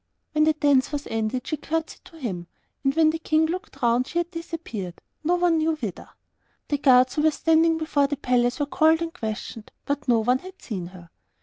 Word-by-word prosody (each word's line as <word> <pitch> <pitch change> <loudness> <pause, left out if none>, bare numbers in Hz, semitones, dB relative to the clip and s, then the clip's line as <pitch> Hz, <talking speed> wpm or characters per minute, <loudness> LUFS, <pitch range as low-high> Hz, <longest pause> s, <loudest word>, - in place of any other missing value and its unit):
When 305 0 +3
the 315 - +4
dance 285 -3 +2
was 290 -1 -3
ended, 225 +3 -1
she 310 - -2
curtseyed 320 +2 -4
to 330 - -15
him, 185 - -4 0.4
and 270 0 +1
when 320 -1 +5
the 325 - -4
King 315 0 +2
looked 355 -3 -5
round 240 +2 +3
she - - -5
had 345 0 0
disappeared, 330 - -6 0.2
no 345 +3 +2
one 350 -2 +2
knew 315 0 +1
whither. 220 - -6 0.6
The 290 - 0
guards 255 -2 +5
who 300 - 0
were 315 - +5
standing 325 +2 +3
before 300 -3 +1
the 290 0 -3
palace 245 -1 +1
were 290 - +1
called 320 +3 +3
and 330 0 -5
questioned, 220 -5 -6 0.2
but 285 0 -3
no 240 -2 +4
one 250 +3 +2
had 375 +3 -12
seen 185 -7 -5
her. 175 -2 -14
290 Hz, 210 wpm, -25 LUFS, 245-320 Hz, 0.6 s, when